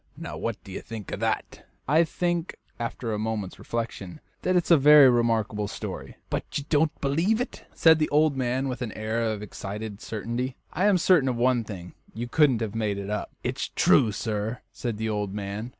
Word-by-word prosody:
Now, - - -6
what 115 -2 -3
do 95 - -11
you 95 - -5
think 110 -4 -8
of - - -4
that?" - - -2 0.2
"I 155 +5 +5
think" 175 +1 -2 0.2
after 115 -1 -3
a 105 - -2
moment's 110 -3 -3
reflection 115 -1 -4 0.2
"that 185 - +1
it's 175 -1 +2
a - - +10
very 145 0 +8
remarkable 115 -3 +1
story." - - -6 0.2
"But - - -1
you 145 - -3
don't 155 0 +2
believe 165 +11 +2
it," 250 - -5
said 160 -1 +6
the 155 - +1
old 150 0 +3
man, 130 +1 0
with 125 -1 -4
an 120 -3 -3
air 110 +2 -2
of 110 -2 -2
excited 105 0 -6
certainty. 120 +4 -3 0.2
"I 185 +5 +1
am 200 -3 +5
certain 165 -6 +4
of 125 - -1
one 120 0 +2
thing; 90 -5 -8 0.2
you 120 +2 -4
couldn't 130 -2 +3
have 110 -2 -2
made 105 -3 -1
it 100 +1 -5
up." 105 - -2
"It's - - -2
true, 120 -6 +4
sir," 110 +2 -3
said 120 -4 -4
the 110 +1 -2
old 105 -2 -2
man. 105 +3 -4
115 Hz, 200 wpm, -26 LUFS, 105-145 Hz, 0.2 s, a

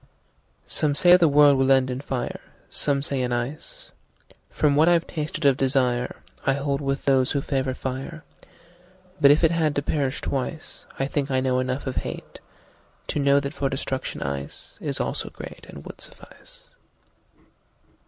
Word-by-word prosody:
SOME 150 -2 0
say 175 +3 +7
the 175 -2 +5
world 145 -1 +6
will 135 0 +3
end 130 -1 +4
in 125 +1 -4
fire, 130 -4 -4 0.3
Some 140 -1 +2
say 140 -3 -1
in 125 -1 -1
ice. 120 +5 -4 0.6
From 145 -2 +2
what 155 +3 +5
I've 170 -1 +3
tasted 155 -1 -4
of 135 -2 +5
desireI 130 0 0
hold 140 0 -1
with 135 0 -2
those 135 -2 +3
who 140 - 0
favor 130 -2 -1
fire. 135 +5 -5 1.0
But 140 - +8
if 150 +4 +5
it 165 - +5
had 160 -3 +1
to 145 - 0
perish 140 -2 -1
twice,I 135 0 -4
think 140 0 -2
I 130 -1 +2
know 130 -1 +1
enough 130 +2 -2
of 130 - -4
hateTo 150 - -7
know 140 0 +4
that 140 +1 -4
for 140 -1 -1
destruction 135 -1 -4
iceIs 70 0 -4
also - - -2
greatAnd - - -10
would - - -10
suffice. - - -11
140 Hz, 155 wpm, -24 LUFS, 130-145 Hz, 1.0 s, But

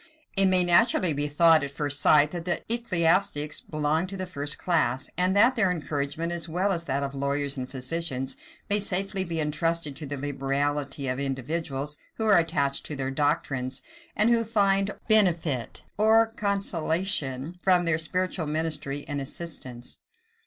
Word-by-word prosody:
It 195 -1 +4
may 185 -1 +5
naturally 175 -1 +4
be 145 +1 -1
thought, 160 +1 +4
at 140 - -3
first 145 0 -2
sight, 150 0 +5
that 175 -2 -6
the 175 - -1
ecclesiastics 170 -8 +1
belong 155 +3 -1
to 195 +1 -5
the 185 - -3
first 145 -5 -1
class, 140 -7 0
and 180 +2 +2
that 235 +6 +5
their 195 -5 +2
encouragement, 155 -1 -3
as 170 -1 -4
well 185 +5 0
as 170 -3 -2
that 140 0 -1
of 140 0 -4
lawyers 140 +1 -1
and 130 -1 -5
physicians, 135 -1 -3 0.3
may 205 0 +4
safely 195 0 0
be 170 -3 -4
intrusted 155 0 -1
to 150 -1 -6
the 145 +1 -4
liberality 140 +1 -2
of 130 +1 -2
individuals, 140 +1 -3 0.2
who 220 - -1
are 205 -5 +6
attached 140 -5 0
to 150 - -4
their 135 -1 -3
doctrines, 135 -2 -1 0.3
and 215 +3 +4
who 230 -1 +3
find 200 -3 +1 0.2
benefit 170 - +1 0.2
or 225 +1 +4
consolation 175 -6 0
from 180 -2 +3
their 165 -1 +1
spiritual 180 0 -2
ministry 150 -2 -2
and 145 -1 -3
assistance. 130 -5 -4
160 Hz, 160 wpm, -26 LUFS, 140-185 Hz, 0.3 s, are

